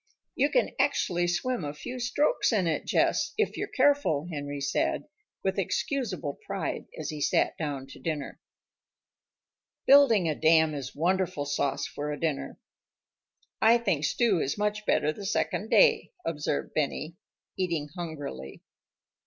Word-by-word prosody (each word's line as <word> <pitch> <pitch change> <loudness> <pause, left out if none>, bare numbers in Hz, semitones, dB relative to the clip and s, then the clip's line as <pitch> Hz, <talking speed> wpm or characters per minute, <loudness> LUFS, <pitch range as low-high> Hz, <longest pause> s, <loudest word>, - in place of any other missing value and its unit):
"You 285 +2 +2
can - - +2
actually 175 -1 +1
swim 180 +5 -1
a 145 0 -4
few 250 +11 -6
strokes 270 - +1
in 205 -5 +2
it, 160 -3 -1
Jess, 315 -2 +1
if 435 - +1
you're - - -3
careful," 275 - +2
Henry 145 -2 -4
said, 140 0 0 0.4
with - - 0
excusable 205 - -2
pride, - - -3
as - - -3
he 150 -1 -6
sat - - +2
down 145 -4 -3
to 135 - -13
dinner. 155 -4 -4 1.5
Building 265 -10 +6
a 155 - +1
dam 160 0 +4
is 135 -3 -6
wonderful 175 -2 0
sauce 140 -1 -1
for 150 +1 -4
a 145 - -5
dinner. 155 -4 -2 1.0
"I 230 +2 +6
think 195 -11 0
stew 210 +2 +2
is 140 +3 -1
much 210 0 -1
better 150 +1 +2
the 205 - -9
second 205 +1 -1
day," - - +4
observed 150 -2 -2
Benny, 155 +2 -2 0.4
eating 170 -5 -1
hungrily. 145 - -7
165 Hz, 145 wpm, -28 LUFS, 145-230 Hz, 1.5 s, Building